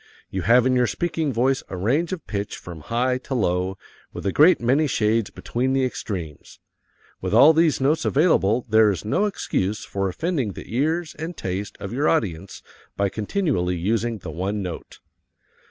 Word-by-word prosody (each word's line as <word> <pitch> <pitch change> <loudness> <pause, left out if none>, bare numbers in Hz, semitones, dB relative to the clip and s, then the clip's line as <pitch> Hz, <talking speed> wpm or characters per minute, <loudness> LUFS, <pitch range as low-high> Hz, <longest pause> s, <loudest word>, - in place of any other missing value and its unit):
You 95 - -2
have 115 +7 +4
in 130 0 +3
your 125 -1 +3
speaking 165 -1 -1
voice 130 +3 +1
a 95 - -5
range 135 - 0
of 185 -3 -5
pitch 100 -1 -4
from 85 -2 -9
high 125 - 0
to 130 +1 -5
low, 95 -3 0 0.3
with - - -8
a 100 - +1
great 165 - +5
many 135 +6 +2
shades 110 -3 +1
between 130 +2 -2
the 135 -1 +2
extremes. 90 - -6 0.6
With 95 +3 -1
all 140 +7 +8
these 160 -1 +3
notes 145 +4 +1
available 125 - +2
there 110 -1 +5
is 100 0 -3
no 155 - +1
excuse 105 - -2
for 100 -1 -2
offending 135 - -2
the 115 - -8
ears 160 +5 0
and 165 +2 -5
taste 95 +2 -4
of 100 +3 -6
your 145 +4 +1
audience 95 - -2 0.3
by 100 0 +1
continually 110 - -1
using 110 +6 -1
the 90 -4 -8
one 95 +5 -3
note. 90 -2 -8
115 Hz, 175 wpm, -23 LUFS, 95-145 Hz, 0.6 s, all